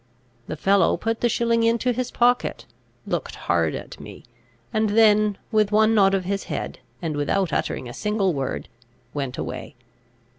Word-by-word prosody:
The - - -4
fellow 195 +2 +3
put 225 0 -2
the 240 - +3
shilling 230 0 +1
into 230 +2 +2
his 250 +1 -2
pocket, 245 +1 +1 0.4
looked - - -3
hard - - 0
at - - -8
me, - - -11 0.5
and 220 -1 +2
then 210 -2 +5
with 215 -2 +2
one 220 +1 +4
nod 195 -2 +4
of 185 -2 -2
his 195 +1 -2
head, - - -4 0.2
and 160 -3 -2
without 160 +4 0
uttering 125 - -2
a 120 - -8
single 210 - 0
word, 135 -2 -3 0.5
went 135 -3 -3
away. - - -6
210 Hz, 160 wpm, -23 LUFS, 190-225 Hz, 0.5 s, then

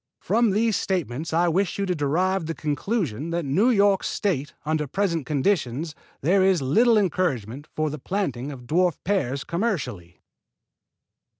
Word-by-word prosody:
From 235 -1 +2
these 215 +2 +2
statements 160 -5 -2
I 170 +2 +3
wish 185 +3 0
you 200 - 0
to 185 - 0
derive 170 +4 0
the 165 - -3
conclusion 150 - -2
that 170 -1 -2
in 135 - -2
New 215 - +4
York 200 -4 +3
State 155 -8 -2
under 155 -1 0
present 170 -3 -1
conditions 150 -1 0 0.3
there 185 +6 +3
is 190 -2 +4
little 220 - +4
encouragement 145 - -1
for 155 -1 0
planting 140 - -2 0.2
dwarf 175 +5 +2
pears 140 -9 0
commercially." 170 - -3
170 Hz, 140 wpm, -24 LUFS, 145-195 Hz, 0.3 s, New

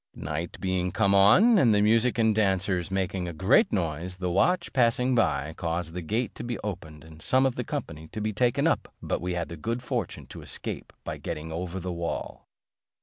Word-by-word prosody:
Night 80 +3 -5
being 95 -1 -1
come 100 +1 +2
on, 185 - +6
and 115 -9 +5
the 105 - +3
music 115 +3 +3
and 110 -1 +3
dancers 95 -3 +1
making 95 -1 -2
a 85 - -4
great 105 - +3
noise, 90 -1 -2
the 90 -1 -2
watch, 175 - +2
passing 125 0 +3
by, 80 - +1
caused 85 0 -3
the 90 - -4
gate 110 +9 -2
to - - -8
be 120 0 -3
opened 80 -7 -6
and 80 -1 -14
some 130 +8 +3
of 135 - +2
the 125 - -3
company 85 - -5
to 110 - -7
be 110 0 -2
taken 120 +3 +2
up; - - +1
but - - -2
we 90 0 -2
had 85 -1 -2
the 85 - -8
good 115 +10 -3
fortune - - -3
to - - -10
escape - - -5
by - - -5
getting 80 +1 -5
over 90 +3 -4
the 90 0 -4
wall. 85 0 -5
95 Hz, 205 wpm, -27 LUFS, 85-115 Hz, -, on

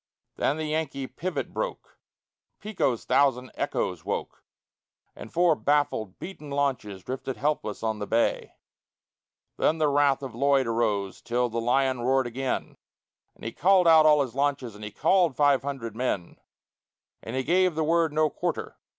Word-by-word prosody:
Then 145 - 0
the 160 - -3
Yankee 150 -3 -2
pivot 185 +7 -4
spoke; - - -5 0.6
Pico's 185 - -1
thousand 130 -3 +2
echoes 90 -4 -2
woke; - - -4 0.7
And - - -10
four 175 -1 +4
baffled, 145 -9 0
beaten 155 -6 -9
launches 130 -9 -2
drifted 130 0 -5
helpless 140 -6 -2
on 110 -1 -1
the 105 - -4
bay. 115 +1 0 1.0
Then 160 - +2
the 155 -2 +2
wrath 140 -1 +2
of 130 - -6
Lloyd 135 +2 +2
arose 105 -4 -1
till 120 +1 0
the 115 +1 -2
lion 130 +1 +1
roared 130 +2 +2
again, 130 +2 -3 0.6
And - - -20
he 115 - -3
called 185 +4 +4
out 160 -1 +7
all 150 -2 +5
his 125 - -7
launches 140 -4 -1
and 105 +1 -11
he 105 - -5
called 165 - +2
five 145 -2 +4
hundred 135 -6 -5
men; 110 -8 -2 0.8
And 115 - -6
he 130 - 0
gave 180 +3 +2
the 160 - 0
word 165 0 +2
"No 155 0 +2
quarter!" - - -4
135 Hz, 160 wpm, -26 LUFS, 120-155 Hz, 1.0 s, out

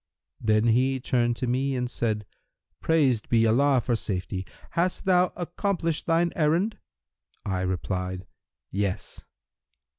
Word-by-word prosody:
Then 110 -1 +2
he 130 +3 +2
turned 120 -1 +1
to 125 - -3
me 130 +3 0
and 125 -1 -1
said, 110 -3 -2 0.5
'Praised 140 -9 +2
be 115 -1 +4
Allah 130 +4 +4
for 120 +1 0
safety! 95 -3 -3 0.2
Hast 180 +4 0
thou 180 -1 +4
accomplished 175 -2 -2
thine 170 +1 +2
errand?' 170 +7 +1 0.7
I 95 -3 -1
replied, 90 0 -2 0.5
'Yes!' 100 -1 -3
125 Hz, 120 wpm, -26 LUFS, 105-160 Hz, 0.7 s, be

